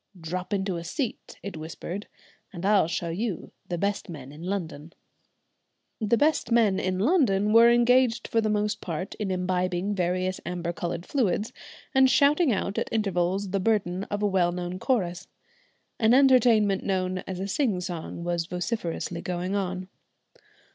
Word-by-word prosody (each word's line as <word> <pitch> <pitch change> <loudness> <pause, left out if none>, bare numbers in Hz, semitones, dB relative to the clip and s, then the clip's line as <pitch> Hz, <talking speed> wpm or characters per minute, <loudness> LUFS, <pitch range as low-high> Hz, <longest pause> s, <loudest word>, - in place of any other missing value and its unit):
"Drop 180 +4 -5
into 195 -3 -1
a 170 - -5
seat," 225 - -4
it 200 -3 -6
whispered, 170 +5 -6 0.4
"and 180 -2 -6
I'll 200 -5 +4
show 170 0 -2
you 200 +3 -3 0.2
the 175 - -2
best 200 +2 -2
men 140 -5 -8
in 150 +2 -12
London." 170 -4 -4 1.1
The 220 +1 +2
best 295 -4 +1
men 220 -5 +4
in 185 0 -1
London 210 - +2
were 230 +1 +8
engaged 240 0 +3
for 225 - +1
the 215 - 0
most 210 0 0
part 175 +2 -4
in 210 -2 -2
imbibing 185 +1 -1
various 185 0 -1
amber 175 -1 -3
coloured 170 0 -4
fluids, 220 -5 0 0.4
and 265 -1 +5
shouting 290 +2 +4
out 200 -1 -1
at - - -3
intervals 195 -2 0
the 195 - 0
burden 195 -2 0
of 205 0 -3
a - - +4
well 185 -3 +2
known 180 +1 -4
chorus. 185 -8 -1 0.7
An 225 +2 +5
entertainment 240 -7 +4
known 185 -1 -1
as 185 -1 -5
a 195 - -3
"sing 210 -3 0
song" 175 -2 -5
was 170 -1 -1
vociferously 180 -2 -3
going 180 +1 -3
on. 185 -2 -2
190 Hz, 160 wpm, -26 LUFS, 175-220 Hz, 1.1 s, were